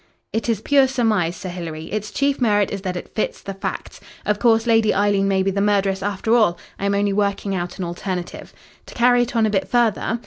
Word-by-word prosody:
"It 225 +1 -2
is 220 -3 0
pure 275 0 +4
surmise, 215 -10 0
Sir 185 - -7
Hilary. 165 -3 -6
Its 215 0 -3
chief 280 +2 0
merit 205 -4 +2
is 200 - -4
that 185 -2 -3
it - - -9
fits 215 - -2
the 195 - -7
facts. 195 - -6 0.2
Of 210 0 0
course, 225 -1 +3
Lady 225 -2 +3
Eileen 200 -1 +2
may 190 -1 +2
be 195 - +1
the 200 +1 -1
murderess 200 -2 +1
after 205 +3 -1
all. 215 -7 +3 0.2
I 200 - -1
am 200 - +1
only 200 0 +1
working 200 -1 -1
out 180 -1 -4
an 185 - -3
alternative. 175 +1 -5 0.4
To - - -12
carry 245 0 +4
it 240 0 -2
on 225 -1 +3
a 215 - 0
bit 195 -2 0
further. 235 -1 +1
205 Hz, 230 wpm, -21 LUFS, 190-225 Hz, 0.4 s, pure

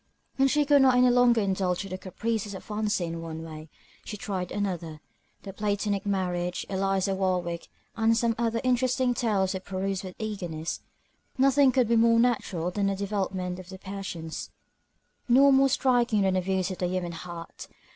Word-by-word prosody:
When 270 0 +4
she 295 +2 +2
could 285 -1 +5
not 260 -2 +5
any 250 0 +5
longer 245 -2 +4
indulge 190 -2 0
the 190 -1 -5
caprices 205 +2 -3
of - - -8
fancy 205 -6 -2
one 165 -1 -6
way, 155 -1 -9 0.3
she 210 - -6
tried 190 -5 -4
another. 175 -6 -3 0.4
The 195 - -8
Platonic 205 0 -1
Marriage, 180 -2 -1
Eliza 195 0 0
Warwick, 180 -3 -1 0.3
and 225 0 +3
some 235 0 +2
other 230 0 0
interesting 255 0 +2
tales 205 -6 0
were 190 - -3
perused 190 0 -3
with 185 -1 -8
eagerness. 175 -7 -4 0.6
Nothing 270 0 +5
could 250 -2 +2
be 230 0 +3
more 230 0 +5
natural 190 -8 0
than 200 +1 0
the 195 - 0
developement 190 -2 -3
of 185 0 -11
the 190 - -8
passions, 190 -5 -6 0.8
nor 275 +3 +6
more 270 0 +5
striking 245 -5 +2
than 190 -1 +2
the 185 - +1
views 190 +1 -1
of 185 - -6
the 180 - 0
human 180 -1 -2
heart. 170 0 -8
195 Hz, 170 wpm, -27 LUFS, 180-230 Hz, 0.8 s, nor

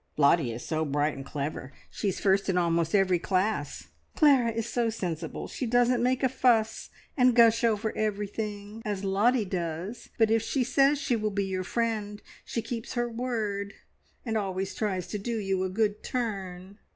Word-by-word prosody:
"Lottie 140 -3 +4
is 115 +1 -7
so 155 -1 -1
bright 145 0 0
and 135 - -7
clever. 140 -1 -5 0.2
She 205 - -1
is 190 - -3
first 195 0 +2
in 185 - +1
almost 170 +1 +1
every 190 -2 +4
single 170 - -10
class." 195 +3 -1 0.3
"Clara 275 -6 +5
is 230 0 -3
so 235 -1 0
sensible. 175 -7 -4
She 255 - -4
doesn't 245 +1 +3
make 255 +2 +1
a - - +6
fuss, 230 -4 +1 0.3
and 250 -3 +4
gush 230 -1 +5
over 220 -1 +1
everything, 210 0 -3
as 205 -2 -3
Lottie 210 +4 +2
does; 180 +3 -4
but 225 -1 +3
if 225 0 +3
she 255 +4 0
says 275 +3 +3
she 280 -3 0
will 215 -1 -1
be 200 -1 -1
your 185 -1 -2
friend, 215 -1 -2 0.2
she 230 - -3
keeps 230 -2 -5
her 240 -1 0
word, 215 -5 -3 0.5
and 225 -2 -2
always 190 -1 -3
tries 190 -5 -2
to 210 - -3
do 230 +3 -3
you 195 -3 -1
a 190 - -1
good 210 +1 0
turn." 195 -5 -4
210 Hz, 185 wpm, -28 LUFS, 185-230 Hz, 0.5 s, a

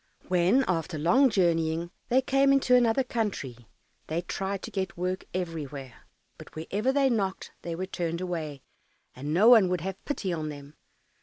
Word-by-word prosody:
When, 185 +9 +3
after 165 -2 -1
long 250 - +4
journeying, 170 -4 +1 0.2
they 260 +2 +3
came 275 +1 +3
into 275 -2 +3
another 245 +1 +4
country, 165 - -4 0.4
they 165 +3 -2
tried 195 +2 -3
to - - -6
get 190 -1 -3
work 185 +1 -2
everywhere; 150 -8 -6 0.3
but - - -13
wherever 205 +10 -1
they 275 0 +3
knocked 200 -6 -1
they 170 -1 -4
were 185 +3 -3
turned 170 -3 -3
away, 160 -6 -4 0.5
and 140 +4 -5
no 190 +8 +4
one 225 -6 +7
would 180 -3 -1
have 190 +2 -5
pity 200 -11 -2
on 155 -2 -3
them. 145 0 -10
180 Hz, 165 wpm, -28 LUFS, 160-220 Hz, 0.5 s, one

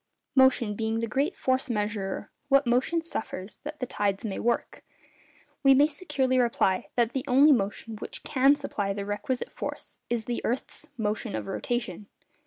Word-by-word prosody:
Motion 260 -5 +4
being 220 +1 -1
the 230 - 0
great 275 - -1
'force 260 0 0
measurer,' 210 -3 -2 0.2
what 275 0 +5
motion 260 +8 +2
suffers 205 - -4
that 300 +1 -6
the 255 - -2
tides 205 -1 -1
may 200 -3 -3
work? 235 +1 -1 0.8
We 275 -1 +6
may 285 +2 +6
securely 280 -6 0
reply, 230 -6 +2
that 240 -2 +2
the 265 0 -2
only 280 +4 +6
motion 215 -1 0
which - - -6
can 275 +1 +4
supply 205 -9 -2
the 200 0 -4
requisite 225 +6 -3
force - - -7
is 235 -2 -1
the 240 - -2
earth's 265 +5 -3
motion 215 -1 -2
of - - -3
rotation. 205 -1 -3
240 Hz, 165 wpm, -27 LUFS, 210-270 Hz, 0.8 s, We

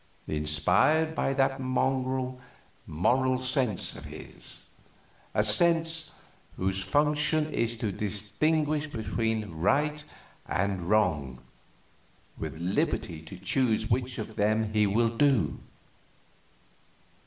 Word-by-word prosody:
Inspired 90 - +2
by 135 - 0
that 135 0 +1
mongrel 130 0 -1 0.5
Moral 130 +11 +1
Sense 130 -6 0
of - - -9
his! - - -10 0.7
A 105 - +3
sense 165 +7 +3 0.5
whose 95 +1 -1
function 150 +1 +1
is 115 0 0
to 110 -2 -2
distinguish 145 +11 -1
between 110 - -2
right 145 - 0 0.4
and 95 -2 -1
wrong, 75 -12 +1 0.9
with - - -6
liberty 85 -2 -1
to 80 +4 -10
choose 110 +3 0
which 125 +1 0
of 110 0 -6
them 110 +1 +1
he 105 -1 +3
will 115 +3 +1
do. 135 -3 +2
115 Hz, 100 wpm, -28 LUFS, 100-140 Hz, 0.9 s, A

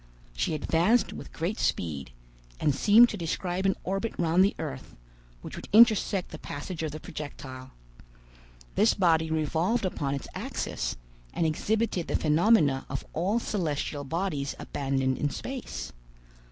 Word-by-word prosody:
She 110 - 0
advanced 170 +10 +2
with - - -9
great 175 +7 -3
speed, 75 -7 -1 0.5
and 145 - +2
seemed 215 - +7
to 210 - -4
describe 180 +2 -1
an 195 - +2
orbit 195 +4 -2
round 170 +2 +4
the 200 - +2
earth, 65 - -6 0.5
which - - -7
would - - -9
intersect 215 -4 +5
the 155 - -8
passage 160 +4 -6
of 155 -2 -2
the 155 - -6
projectile. 130 -4 -8 1.0
This 215 +2 +4
body 165 -4 +3
revolved 160 +8 0
upon 140 -6 -1
its 140 - -6
axis, - - -3 0.4
and 165 - +1
exhibited 195 +3 0
the - - -1
phenomena 155 -3 +3
of - - -4
all 190 +7 +1
celestial 155 -9 -2
bodies 145 -2 -2
abandoned 135 -1 -1
in 145 - +1
space. 260 - -6
165 Hz, 140 wpm, -28 LUFS, 145-195 Hz, 1.0 s, seemed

